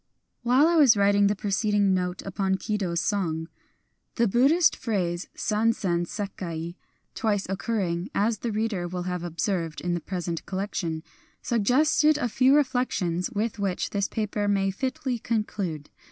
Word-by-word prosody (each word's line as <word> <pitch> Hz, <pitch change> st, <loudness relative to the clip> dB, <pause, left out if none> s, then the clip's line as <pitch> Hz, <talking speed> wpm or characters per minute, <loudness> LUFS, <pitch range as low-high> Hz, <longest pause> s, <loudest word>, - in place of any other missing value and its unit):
While 250 Hz, +5 st, +4 dB
I 340 Hz, 0 st, +3 dB
was 270 Hz, -9 st, +6 dB
writing 200 Hz, 0 st, +4 dB
the 205 Hz, -, +1 dB
preceding 205 Hz, 0 st, +1 dB
note 180 Hz, 0 st, -2 dB
upon 195 Hz, 0 st, -1 dB
Kido's 190 Hz, -4 st, -2 dB
song, 165 Hz, -6 st, -1 dB, 0.7 s
the 235 Hz, -1 st, +3 dB
Buddhist 280 Hz, -, +4 dB
phrase, 180 Hz, -6 st, -2 dB
San 225 Hz, +1 st, +1 dB
zen 175 Hz, -5 st, -1 dB
sekai 170 Hz, -5 st, -5 dB, 0.4 s
(twice 210 Hz, -4 st, 0 dB
occurring, 190 Hz, -2 st, -2 dB
as 215 Hz, +1 st, +1 dB
the 235 Hz, -, -2 dB
reader 210 Hz, -4 st, -1 dB
will 180 Hz, 0 st, -4 dB
have 180 Hz, -1 st, -3 dB
observed, 170 Hz, -1 st, -2 dB
in 175 Hz, 0 st, -2 dB
the 175 Hz, -, -1 dB
present 175 Hz, -2 st, -4 dB
collection), 185 Hz, -5 st, -3 dB, 0.4 s
sug 230 Hz, -4 st, 0 dB
gested 300 Hz, +4 st, +4 dB
a 245 Hz, -5 st, -1 dB
few 260 Hz, +4 st, +4 dB
reflections 250 Hz, -, 0 dB
with 225 Hz, -1 st, -2 dB
which 195 Hz, -3 st, -1 dB
this 200 Hz, -1 st, 0 dB
paper 210 Hz, -1 st, -2 dB
may 195 Hz, -1 st, +2 dB
fitly 255 Hz, +3 st, -3 dB
conclude. 200 Hz, -9 st, -3 dB
200 Hz, 150 wpm, -26 LUFS, 180-230 Hz, 0.7 s, was